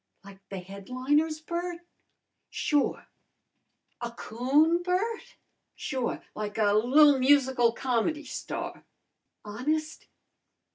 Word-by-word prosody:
"Like 195 -1 -13
the 195 - -5
headliners, 255 - -1
Bert?" 345 +1 -4 0.7
"Sure!" 295 -2 0 1.0
"A 240 - -3
coon, 275 +9 +1
Bert?" 375 +6 -2 0.4
"Sure! 260 -4 -3
Like 210 0 -5
a 205 -2 +3
li'l 270 +6 +5
musical 260 -3 +4
com'dy 265 +5 -1
star." - - -6 0.6
"Honest?" 305 +9 -3
265 Hz, 90 wpm, -28 LUFS, 230-310 Hz, 1.0 s, li'l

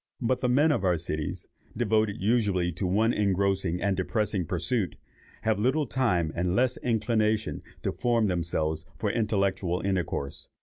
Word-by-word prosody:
But 125 0 +1
the 125 - 0
men 145 +6 +4
of 120 - 0
our 90 -2 +3
cities, 75 -2 -3 0.3
devoted 110 -3 +1
usually 100 -4 +1
to 90 +3 -2
one 110 +6 +2
engrossing 95 -3 +1
and 100 -1 +2
depressing 100 -1 -1
pursuit, 90 +1 -1 0.5
have 110 -2 +1
little 135 +7 +2
time 95 -12 +1
and 90 +1 0
less 125 +2 +2
inclination 110 -2 0 0.2
to - - 0
form 120 -2 +1
themselves 85 -3 -1
for 105 -3 0
intellectual 100 -5 0
intercourse. 90 -7 -2
100 Hz, 145 wpm, -28 LUFS, 90-115 Hz, 0.5 s, men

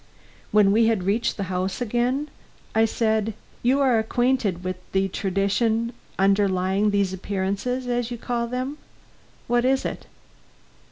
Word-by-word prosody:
When 205 -2 +5
we 225 +2 +4
had 220 -5 +1
reached 210 +5 0
the 200 - -2
house 185 0 -2
again, 245 +5 0 0.4
I 225 0 +4
said: 220 -1 0 0.3
"You 260 +4 +3
are 255 -5 +4
acquainted 220 -5 0
with 185 0 -3 0.2
the 195 0 +2
tradition 215 +5 0 0.2
underlying 195 0 +2
these 200 -2 +1
appearances, 200 +7 -2
as 245 -1 -1
you 240 - -5
call 235 0 -2
them. 255 +4 -4 0.7
What 240 0 +2
is 265 +1 +2
it?" - - -5
220 Hz, 135 wpm, -24 LUFS, 195-245 Hz, 0.7 s, When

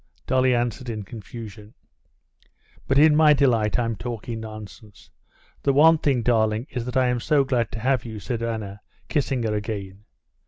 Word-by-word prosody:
Dolly 130 -1 +2
answered 120 +1 -2
in 110 -2 -4
confusion. 105 0 -10 1.1
"But 135 - +2
in 150 +1 +6
my 155 -1 +6
delight 120 -7 +2
I'm 115 -2 -1
talking 115 0 -5
nonsense. 110 -1 -11 0.5
The 140 - +2
one 160 +3 +6
thing, 135 -6 +1
darling, 110 -1 +1
is 120 -2 -4
that 125 +1 -3
I 130 - +4
am 125 0 0
so 145 +3 +2
glad 125 -4 -1
to 115 - -4
have 130 +1 +1
you!" 110 -3 -7
said 115 +2 -4
Anna, 110 -3 -4 0.3
kissing 135 -5 0
her 110 -1 -1
again. 105 -2 -5
115 Hz, 165 wpm, -24 LUFS, 110-130 Hz, 1.1 s, in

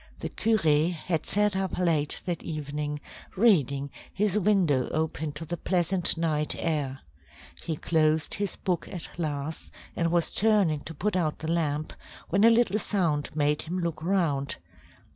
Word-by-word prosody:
The - - -5
curé 165 -7 +2
had 165 -1 -3
sat 210 -1 +2
up 190 -1 -2
late 160 -5 0
that 175 -3 -2
evening, 150 -1 -4 0.4
reading, 140 - +3 0.2
his 205 -1 0
window 185 -10 +2
open 155 -1 -2
to 155 +2 -6
the 175 +2 -4
pleasant 180 -1 +1
night 155 -2 0
air. 145 -5 -2 0.6
He 160 -1 -3
closed 155 0 +2
his 200 -2 -1
book 180 -3 -2
at 175 -3 -6
last, 150 -1 -3 0.3
and 165 -1 0
was 170 -1 +2
turning 200 -8 +3
to 160 - -7
put 205 +6 -1
out 160 -4 0
the 160 +1 -3
lamp, 155 -2 -1 0.4
when 195 +4 +2
a 230 - +8
little 230 -3 +3
sound 165 -10 0
made 150 0 +1
him 175 +3 -3
look 170 -3 -2
round. 160 -6 0
165 Hz, 155 wpm, -27 LUFS, 150-185 Hz, 0.6 s, a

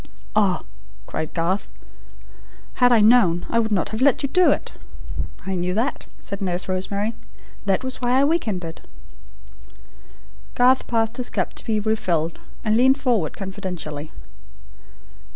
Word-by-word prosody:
"Ah," 200 -4 +2 0.4
cried 155 - -4
Garth, 180 +4 -1 1.1
"had 245 0 +6
I 230 -3 +6
known, 210 -6 +5
I 230 - +3
would 220 -1 0
not 190 -5 +1
have 220 +2 -4
let 280 0 +4
you 280 - 0
do 365 +4 +5
it!" - - 0 0.7
"I 190 - -2
knew 180 0 -1
that," 240 +6 -1
said 200 +1 -5
Nurse 180 -1 0
Rosemary. 200 +4 -1 0.5
"That 195 +5 +2
was 260 0 -4
why 245 0 +1
I 265 +2 +4
week 315 -1 +1
ended." 180 -5 -4 1.7
Garth 255 +1 +4
passed 225 0 0
his 250 - -1
cup - - -2
to - - -7
be 220 -2 +1
refilled, 175 -7 0 0.3
and 215 0 +3
leaned 260 +4 +4
forward 230 - 0
confidentially. 180 -7 -5
215 Hz, 145 wpm, -23 LUFS, 180-245 Hz, 1.7 s, had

